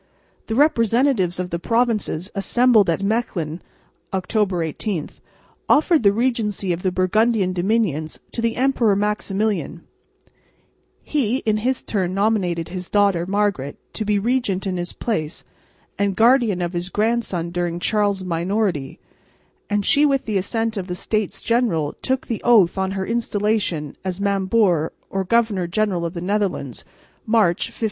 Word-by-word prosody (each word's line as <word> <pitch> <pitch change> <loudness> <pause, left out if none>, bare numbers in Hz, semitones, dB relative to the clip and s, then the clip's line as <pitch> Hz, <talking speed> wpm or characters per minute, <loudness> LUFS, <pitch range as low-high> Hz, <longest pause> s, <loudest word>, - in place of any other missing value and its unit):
The 225 - -2
representatives 230 - +2
of 180 0 -3
the 170 - -2
provinces, 225 -5 0
assembled 220 0 +3
at 170 +4 0
Mechlin 190 -7 -1 0.5
(October 190 -1 0
18), 165 +1 -3 0.6
offered 315 +1 +4
the 200 -3 +5
regency 210 -5 0
of 170 - -5
the 185 - 0
Burgundian 190 +1 +2
dominions 175 -5 0
to 230 - -3
the 230 0 0
Emperor 250 -5 +2
Maximilian; 210 0 -1 1.2
he 260 -5 0
in 215 -1 +2
his 250 +4 -1
turn 185 -3 -2
nominated 195 -5 0
his 180 -1 -6
daughter, 200 -4 +2
Margaret, 200 -8 -1 0.2
to 220 - -2
be 210 -1 +1
regent 210 -3 0
in 185 -2 -2
his 175 0 -3
place 160 -9 -3 0.6
and 200 -1 +1
guardian 225 -4 +3
of 175 +1 -3
his 175 +1 -3
grandson 210 -5 -1
during 175 -1 -2
Charles' 205 -1 +1
minority, 175 -4 -1 0.7
and 205 -1 0
she 290 - +4
with 275 -2 0
the 215 -3 0
assent 225 +3 -2
of 185 -2 -4
the 180 - -4
States 215 +2 -2
General 220 -11 +1
took 260 0 -1
the 230 - -4
oath 215 -8 +5
on 190 0 -1
her 190 - -2
installation 210 -8 -1
as 185 0 -3
Mambour 195 -4 +1 0.2
or 195 0 -1
Governor 205 -3 +1
General 185 -2 0
of 165 - -9
the 170 - -4
Netherlands, 185 - -2 0.4
March, 215 -6 +2
1507. - - -15
200 Hz, 145 wpm, -21 LUFS, 180-225 Hz, 1.2 s, the